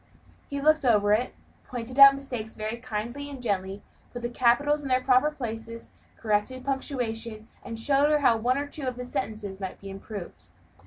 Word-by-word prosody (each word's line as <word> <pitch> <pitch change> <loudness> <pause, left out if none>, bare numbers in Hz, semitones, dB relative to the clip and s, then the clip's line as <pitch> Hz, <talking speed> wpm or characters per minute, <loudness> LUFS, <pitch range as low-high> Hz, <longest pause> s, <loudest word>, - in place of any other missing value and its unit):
He 280 - -3
looked 310 +2 +3
over 210 -4 +4
it, 240 +4 0 0.3
pointed 250 +1 -5
out 275 0 +13
the 275 - -4
mistakes 245 -5 -6
very 215 +2 -4
kindly 240 +4 -5
and 275 -2 -8
gently, 200 -4 -2 0.3
put 245 -1 -7
the 240 - -2
capitals 285 +5 +3
in 280 - -6
their 255 -1 +2
proper 255 +3 +4
places, 230 -5 -7 0.3
corrected 220 +4 -1
the - - -17
punctuation, 230 -5 -3 0.2
and 230 -1 -6
showed 280 +5 +3
her 300 -1 +3
how 235 -4 +4
one 245 +4 +1
or 285 - -1
two 285 -1 -6
of 255 - -2
her 250 0 -6
sentences 205 -3 -4
might 190 -2 -6
be 195 0 -9
improved. 195 - -9
240 Hz, 195 wpm, -27 LUFS, 215-275 Hz, 0.3 s, out